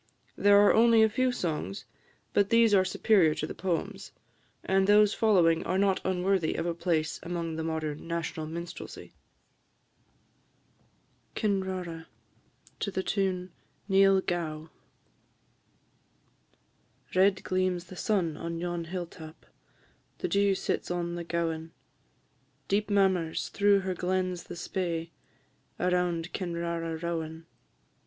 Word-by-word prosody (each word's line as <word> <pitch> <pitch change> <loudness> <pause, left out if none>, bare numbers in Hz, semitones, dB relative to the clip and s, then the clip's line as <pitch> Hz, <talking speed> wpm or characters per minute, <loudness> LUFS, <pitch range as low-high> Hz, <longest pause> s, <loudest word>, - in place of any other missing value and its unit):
There 205 0 +5
are - - +6
only 230 0 +6
a 220 - +4
few 255 +4 +1
songs, 155 - -3 0.5
but 200 -1 +3
these 230 -2 +5
are 190 -2 +6
superior 185 -4 +3
to 155 - -2
the - - -6
poems; 195 +2 -3 0.5
and 190 0 +2
those 210 0 +5
following 175 -7 +3
are 185 - -1
not 195 -1 +2
unworthy 185 -2 0
of - - -2
a 170 - 0
place 165 -3 -1
among 170 -2 -4
the 160 - -3
modern 160 -1 -3
national 165 -2 -3
minstrelsy. 170 +2 -8 2.2
KINRARA. 190 -5 -2 0.7
TUNE 190 -2 -1 0.4
"Neil 195 -1 +5
Gow." 160 -3 -3 2.4
Red 190 +1 +3
gleams 185 -1 0
the 185 +1 -12
sun 180 -5 0
on 170 0 -4
yon 175 0 -3
hill 175 +1 -4
tap, 160 -1 -13 0.7
The 370 - -2
dew 200 - +2
sits - - -2
on 175 -1 -2
the 175 0 -4
gowan; 165 -1 -3 0.9
Deep 205 +2 0
murmurs 190 -5 +1
through 200 -1 +3
her 190 0 -2
glens 185 0 -2
the - - -8
Spey, 170 -2 -3 0.7
Around 180 -1 0
Kinrara 170 -2 -3
rowan. 165 -1 -4
180 Hz, 120 wpm, -29 LUFS, 165-195 Hz, 2.4 s, are